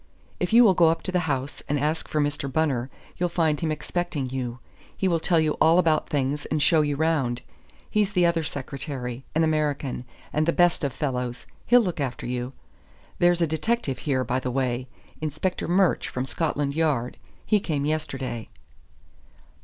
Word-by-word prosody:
If 180 - -1
you 235 +2 +8
will 205 -5 +6
go 170 -2 +5
up 165 - -1
to 185 - -3
the 175 -3 0
house 135 +2 -3
and 145 0 +1
ask 155 +3 -1
for 155 - -1
Mr. 145 -2 -1
Bunner, 135 -4 0 0.3
you'll 175 0 0
find 160 -4 +1
him 160 -2 -1
expecting 155 -3 -3
you; 125 -2 -3 0.4
he 190 - +1
will 170 -2 +2
tell 165 +1 +2
you 155 -1 +2
all 165 +2 +6
about 160 -4 +2
things 145 +1 -1
and 155 - 0
show 155 +2 +4
you 145 -1 0
round. 140 -6 0 0.4
He's 210 -1 +1
the 180 -3 +4
other 170 -1 +2
secretary; 135 -3 -5
an 160 - +4
American, 150 -5 0 0.3
and 155 +1 +1
the 170 - +3
best 175 -2 +3
of 140 - 0
fellows; 125 -4 -3 0.2
he'll 245 +1 +7
look 180 -7 -2
after 130 -4 -3
you. 125 +1 -3 0.7
There's 175 0 +4
a - - +5
detective 160 - -1
here, 130 -4 0
by 125 +1 0
the 130 - -3
way; 125 -1 -1 0.3
Inspector 155 +4 -2
Murch, 180 +1 +3
from 125 +1 -3
Scotland 145 +1 -1
Yard. 145 -7 0 0.3
He 215 - +3
came 150 -7 -2
yesterday." 135 -6 -3
150 Hz, 180 wpm, -25 LUFS, 130-170 Hz, 0.7 s, you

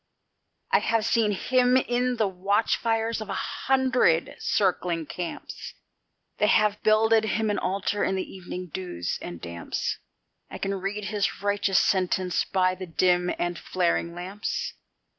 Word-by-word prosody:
I 470 - +5
have 225 -1 +1
seen 225 -2 +2
Him 250 +5 +3
in 250 0 +1
the 220 -3 +1
watch 195 +4 +1
fires 225 -1 -1
of 215 - -7
a 195 - -2
hundred 255 -13 +1
circling 180 -4 0
camps; 175 +2 -6 0.6
They 210 - +4
have 210 -1 +3
builded 220 +1 +4
Him 220 0 0
an 205 - 0
altar 200 +2 -1
in 190 - +1
the 190 - -1
evening 185 -1 -7
dews 130 - -3
and 85 -1 -7
damps; 85 0 -4 0.5
I - - -7
can 195 0 -2
read 200 +2 -3
his 205 -1 -2
righteous 205 -2 +2
sentence 185 -1 +2
by 185 -2 +2
the 185 0 -7
dim 180 +1 +2
and 175 0 -2
flaring 170 -1 0
lamps. 190 +4 -4
200 Hz, 145 wpm, -26 LUFS, 180-220 Hz, 0.6 s, I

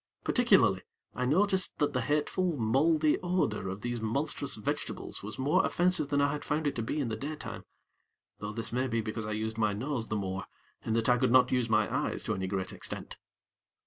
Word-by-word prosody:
Particularly, - - +4 0.3
I 125 - -1
noticed 190 +5 +2
that 145 - +1
the 125 - +1
hateful, 150 +5 0
mouldy 150 +7 +3
odor 175 - 0
of 95 +2 -5
these 120 0 -3
monstrous 140 +5 -1
vegetables 105 - -4
was 105 +2 -7
more 135 +3 +3
offensive 180 -4 +2
than 145 -1 +2
I 140 0 +3
had 145 0 -4
found 150 +1 -1
it 145 - 0
to - - 0
be 115 +7 -2
in 130 -5 -1
the 110 - -2
daytime; 125 -3 -6 0.7
though 105 0 -4
this 115 +1 -3
may 130 +2 +1
be 115 -2 0
because 110 0 -4
I 105 - -2
used 110 +1 -3
my 105 -2 +2
nose 120 +2 -2
the 110 - -2
more, 95 -2 -3 0.4
in 110 - -1
that 115 0 +1
I 125 -1 +4
could 130 -2 +2
not 125 0 +5
use 125 -2 +1
my 110 -2 +3
eyes - - -1
to - - -1
any 95 0 -2
great 95 -1 -3
extent. - - -6
120 Hz, 210 wpm, -30 LUFS, 110-145 Hz, 0.7 s, not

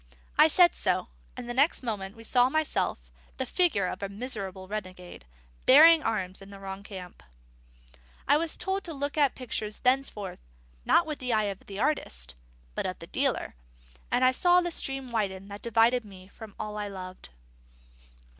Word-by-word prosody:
I 310 - +7
said 345 +2 +5
so; - - 0 0.3
and 250 -1 -6
the 240 - -3
next 280 +3 +2
moment 215 -1 -5
saw 245 +2 +4
myself, 315 +2 0 0.4
the - - -2
figure 335 - +2
of 180 - -4
a 200 - -3
miserable 200 -4 -5
renegade, 185 - -7 0.4
bearing 315 +5 +9
arms 195 -7 -2
in 195 - -12
the 200 -1 -11
wrong 195 0 -7
camp. 185 -3 -10 1.1
I - - +6
was 325 0 -2
to 385 0 -1
look 285 +1 -3
at 285 -4 +3
pictures 220 -4 -4
thenceforward, 250 -6 0 0.5
not 345 - +4
with 305 -2 -5
the 250 -2 -1
eye 215 -1 +3
of 190 - -23
the 195 - -7
artist, 65 - -1 0.4
but - - -3
the - - -8
dealer; - - -1 0.6
and 255 - +3
I 255 - +6
saw 355 +6 +4
the 350 -1 -2
stream 270 -5 -3
widen 195 -3 -2
that 200 +1 -8
divided 235 +2 +3
me 190 -2 -14
from 215 -1 -12
all 210 0 -5
I 205 - -3
loved. 185 - -8
225 Hz, 165 wpm, -28 LUFS, 195-270 Hz, 1.1 s, bearing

